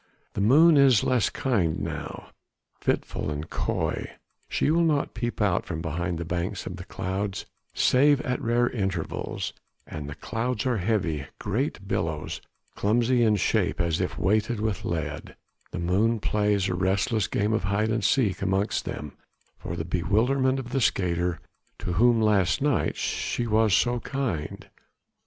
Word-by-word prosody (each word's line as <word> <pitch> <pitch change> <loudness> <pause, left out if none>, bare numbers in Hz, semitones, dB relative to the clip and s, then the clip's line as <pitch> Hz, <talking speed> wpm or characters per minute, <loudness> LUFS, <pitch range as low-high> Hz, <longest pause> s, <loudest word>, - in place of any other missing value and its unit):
The - - -2
moon 150 +9 +6
is 135 -6 +6
less 125 -2 +2
kind 100 -12 0
now, - - -6 0.5
fitful - - -1
and 75 +1 -4
coy; - - -2 0.4
she - - +1
will 170 +2 +3
not 155 -4 +1
peep 120 0 -3
out 100 -4 +1
from 80 -3 -3
behind 85 +2 -2
the 85 - -4
banks 90 +3 -3
of 90 - -5
clouds 95 +1 -3 0.3
save 140 +2 +4
at 125 0 -2
rare 120 +1 +2
intervals; 95 -8 -3 0.3
and 75 -3 -7
the 70 - -6
clouds 120 +1 -2
are 125 -3 +1
heavy; 90 - -1
great - - -2
billows, - - -2 0.3
clumsy 120 +4 +2
in 110 -2 +4
shape 100 - +1
as 85 -2 +1
if - - -2
weighted 110 +4 +1
with 110 -1 -2
lead; 80 -3 -4 0.3
the - - -6
moon 100 +7 +1
plays 105 -1 +1
a 95 - -1
restless 95 +4 +1
game 105 +2 0
of 110 - 0
hide 105 +2 +1
and 110 -1 0
seek 105 -8 +2
amongst 95 +2 0
them 75 0 -6 0.4
for 85 - -5
the 80 -1 -3
bewilderment 115 +10 +1
of 125 -2 -6
the 135 - 0
skater, 90 -5 +1 0.4
to 90 - -3
whom 120 +5 +4
last 100 -4 +3
night 145 -4 +1
she 120 - -2
was 110 -1 +3
so 120 +6 +3
kind. 115 - -3
105 Hz, 155 wpm, -26 LUFS, 90-120 Hz, 0.5 s, moon